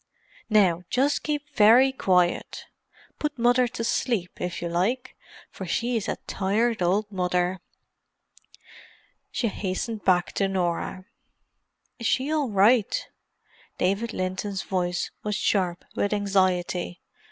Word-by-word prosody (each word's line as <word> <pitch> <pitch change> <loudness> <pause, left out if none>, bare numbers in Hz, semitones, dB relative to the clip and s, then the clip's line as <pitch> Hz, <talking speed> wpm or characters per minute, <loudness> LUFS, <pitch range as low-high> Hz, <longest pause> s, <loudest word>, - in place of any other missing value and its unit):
"Now 190 -6 +4
just 280 +3 +1
keep 295 -1 -3
very 245 +4 +6
quiet—put 190 +8 -2
Mother 245 +1 +3
to 230 - -5
sleep, 225 -5 -1
if 180 -1 -3
you 175 - -3
like, 190 +10 -1 0.4
for 190 - -7
she's 230 +5 -1
a - - -1
tired 215 +3 0
old 200 +4 +1
mother." 180 -1 0 1.7
She 235 - -1
hastened 205 +2 -3
back 180 -2 +2
to 195 - 0
Norah. 185 0 -2 0.9
"Is 230 - -1
she 270 +3 +1
all 300 -5 +1
right?" 210 +2 +3 0.7
David 200 +5 0
Linton's 190 +1 -3
voice 180 -2 -2
was 210 -1 -1
sharp 185 -4 0
with 205 - 0
anxiety. 185 - 0
200 Hz, 115 wpm, -25 LUFS, 180-235 Hz, 1.7 s, very